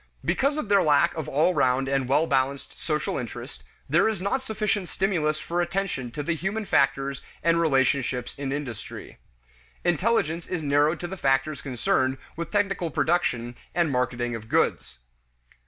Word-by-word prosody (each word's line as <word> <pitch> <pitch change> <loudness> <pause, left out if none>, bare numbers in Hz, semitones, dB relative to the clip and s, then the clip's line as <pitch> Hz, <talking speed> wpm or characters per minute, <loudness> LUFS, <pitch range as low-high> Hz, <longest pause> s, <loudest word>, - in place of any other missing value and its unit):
Because 280 +3 +1
of 305 - -2
their 200 -1 +5
lack 150 +2 +4
of 160 -4 -4
all 155 +6 +3
round 130 -2 +2
and 135 -2 0
well 150 +4 +4
balanced 135 -1 -1
social 150 -2 -1
interest, 120 +1 -7 0.2
there 170 +9 +4
is 215 -4 -2
not 200 +8 0
sufficient 210 -5 -1
stimulus 165 -6 0
for 175 +2 -2
attention 175 -7 -2
to 145 +5 -5
the 170 - 0
human 195 +7 -2
factors 135 -4 +1 0.2
and 170 0 +3
relationships 130 -4 +1
in 135 -1 -2
industry. 140 -6 -6 0.6
Intelligence 175 -2 +1
is 175 -3 -3
narrowed 145 +3 +2
to 175 - -3
the 190 +2 -6
factors 135 0 +1
concerned 130 0 0 0.2
with 170 +1 -4
technical 195 -4 0
production 125 -8 0 0.2
and 170 -4 +2
marketing 120 -1 -1
of 110 -1 -7
goods. 60 - +1
155 Hz, 155 wpm, -26 LUFS, 135-180 Hz, 0.6 s, their